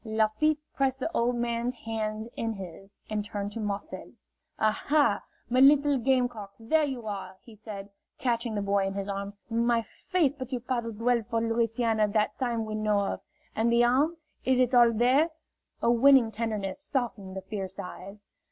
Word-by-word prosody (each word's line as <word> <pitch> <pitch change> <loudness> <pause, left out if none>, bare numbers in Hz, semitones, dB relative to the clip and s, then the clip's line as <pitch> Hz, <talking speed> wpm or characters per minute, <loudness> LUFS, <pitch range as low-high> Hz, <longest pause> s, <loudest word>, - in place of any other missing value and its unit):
Lafitte 220 +7 +1 0.2
pressed 265 -1 +1
the 300 - -2
old 240 +1 +2
man's 240 +1 -1
hands 220 -1 -4
in 225 -1 -2
his, 195 0 -10
and 215 -1 -2
turned 205 -1 -4
to 225 - -5
Marcel. 205 -2 -5 0.4
"Aha, 280 +7 +2 0.3
my 250 +1 +1
little 285 0 +6
game 255 0 +3
cock, 210 -5 -10
there 305 +8 +2
you 260 -5 -5
are!" 200 -2 -5
he 230 - -14
said, 210 -2 -8 0.3
catching 235 -2 -1
the 205 - -1
boy 200 -1 +1
in 195 - -4
his 200 0 -3
arms. 200 0 -4
"My 235 0 +1
faith, 330 - 0
but 255 0 -6
you 250 - -1
paddled 235 -3 -3
well 240 0 +2
for 230 - +1
Louisiana 225 -1 +1
that 210 +1 0
time 235 -3 -1
we 215 - -5
know 215 -1 +1
of! 200 - -2 0.3
And 225 +2 +2
the 235 0 +5
arm? 280 +8 +2 0.3
Is 260 -1 +2
it 255 0 +2
all 240 -1 +7
there?" 255 +8 +3 0.5
A 235 - +4
winning 245 -1 +6
tenderness 220 +3 -3
softened 230 -9 -3
the - - -4
fierce 190 -1 -6
eyes. 195 +3 -8
230 Hz, 180 wpm, -28 LUFS, 210-250 Hz, 0.5 s, all